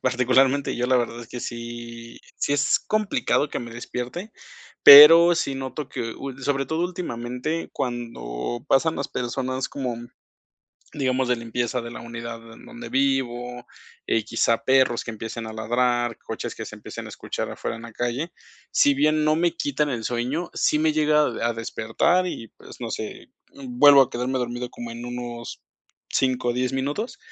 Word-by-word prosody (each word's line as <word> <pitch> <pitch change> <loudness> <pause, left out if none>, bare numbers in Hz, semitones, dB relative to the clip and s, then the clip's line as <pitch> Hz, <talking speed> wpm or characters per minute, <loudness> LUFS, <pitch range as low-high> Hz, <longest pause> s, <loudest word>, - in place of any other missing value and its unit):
Particularmente 130 +2 +2
yo, 125 0 0
la 130 - +3
verdad 120 -1 -2
es 115 - -10
que 125 -1 -7
sí, 115 0 -7 0.2
sí - - -1
es 145 0 +3
complicado 210 -8 +1
que - - -4
me 120 -1 -8
despierte, 125 - -6 0.5
pero 165 +4 +11
sí 140 -4 -1
noto 135 +1 -5
que 115 -3 -5
ul 135 -1 -7
sobre 135 0 0
todo 160 +5 -2
últimamente, 155 -2 -4
cuando 120 - -4
pasan 160 +4 +3
las 140 - -3
personas, 130 +1 -3
como, 125 -4 -3 1.0
digamos, 130 -2 0
de 125 - +2
limpieza 120 +2 -2
de 115 - -7
la - - -8
unidad 115 -1 -8
en - - -15
donde 240 0 -9
vivo, 125 -3 -1 0.4
eh, 115 - +1
quizá 115 0 +1
perros 130 -2 +3
que 115 - -5
empiecen 110 +1 -6
a 110 - -7
ladrar, 120 +1 0
coches - - -6
que - - -7
se - - -9
empiecen - - -8
a - - -8
escuchar - - -5
afuera - - -4
en 115 - -11
la 115 -1 -10
calle, 125 +9 -3 0.4
si 145 - +4
bien 150 +2 +2
no 155 - +3
me 170 +1 +1
quitan 145 -2 0
el 120 -5 -3
sueño, 125 +8 -2
sí 150 - +1
me 155 0 +2
llega 150 0 +3
a 120 -4 -1
a - - 0
despertar 115 +11 0
y, 115 -10 -6
pues, - - -12
no 115 - -4
sé, 110 - -6 0.2
mm, 260 -3 -9
vuelvo 145 - +9
a 130 - -2
quedarme 125 +2 -2
dormido 120 0 -3
como 120 -1 -8
en 120 +1 -7
unos 120 -1 -7 0.5
5 130 -2 +1
o - - +2
10 125 +1 -1
minutos, 145 - -3
125 Hz, 180 wpm, -24 LUFS, 120-145 Hz, 1.0 s, pero